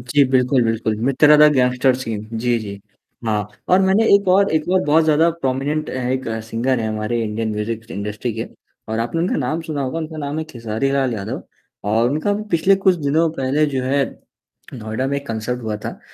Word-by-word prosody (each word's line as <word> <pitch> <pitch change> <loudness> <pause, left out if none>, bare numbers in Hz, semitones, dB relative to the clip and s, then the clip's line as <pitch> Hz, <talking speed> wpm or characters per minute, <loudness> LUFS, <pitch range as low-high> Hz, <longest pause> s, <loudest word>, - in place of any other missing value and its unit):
जी, 135 +4 +3
बिल्कुल, 125 0 +3
बिल्कुल, 115 -1 0
मित्रा 150 +2 +5
दा 150 0 +8
गैंगस्टर 125 -1 +2
सीन 110 -5 -5
जी, 120 0 +1
जी। 100 -2 -7 0.5
हाँ, 105 -2 -1 0.2
और 185 +1 +5
मैंने 195 +4 +3
एक 200 -2 +3
और 195 +2 +4
एक 155 0 0
और 185 - +4
बहुत 155 +2 +4
ज़्यादा 160 +2 +4
प्रोमिनेंट 145 0 -2
हैं 125 -1 -2
एक 130 0 -2 0.2
सिंगर 115 +2 -1
है 110 - -1
हमारे 110 +2 -2
इंडियन 110 +1 -2
म्यूजिक 110 +2 -3
इंडस्ट्री 105 +4 -4
के। - - -3 0.4
और 110 +1 -2
आपने 120 +9 -1
उनका 180 - 0
नाम 150 +5 -1
सुना 150 -4 -2
होगा 135 +5 -3
उनका 160 0 -6
नाम 145 +1 -3
है 160 - -2
खेसारी 120 -2 -3
लाल 135 -3 +1
यादव, 100 -2 -5 0.4
और 115 +4 +2
उनका 155 +8 -1
अभी 205 +1 -1
पिछले 180 +4 +4
कुछ 190 - +6
दिनों 155 +2 +1
पहले 135 +3 +1
जो 135 -3 -2
है, 140 +1 +2 0.7
नोएडा 110 +2 -3
में 140 - -1
एक 140 - -7
कंसर्ट 115 +2 -3
हुआ 110 -2 -3
था, - - -6
130 Hz, 205 wpm, -20 LUFS, 115-155 Hz, 0.7 s, दा